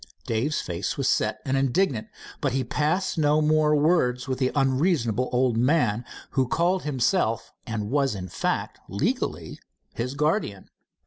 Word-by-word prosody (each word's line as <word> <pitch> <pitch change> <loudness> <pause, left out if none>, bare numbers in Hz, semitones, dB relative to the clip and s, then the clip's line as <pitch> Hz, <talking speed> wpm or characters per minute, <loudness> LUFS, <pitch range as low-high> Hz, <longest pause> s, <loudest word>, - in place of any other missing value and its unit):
Dave's 120 +7 0
face 85 +1 -3
was 135 -2 0
set 110 0 +1
and 135 - 0
indignant, 135 - +1 0.3
but 140 -4 0
he 135 0 0
passed 160 +8 0
no 150 0 +3
more 155 0 +3
words 145 -5 +2
with 130 -1 -2
the 130 -1 +1
unreasonable 130 - +1
old 125 -2 +2
man 120 -3 +2 0.3
who 130 -2 +1
called 175 +6 +1
himself, 130 - 0
and 110 -2 -3
was 140 -5 +1
in 95 -1 -5
fact, - - -2
legally 100 - -2 0.3
his 125 +4 -3
guardian. 150 - -1
135 Hz, 145 wpm, -25 LUFS, 115-150 Hz, 0.3 s, no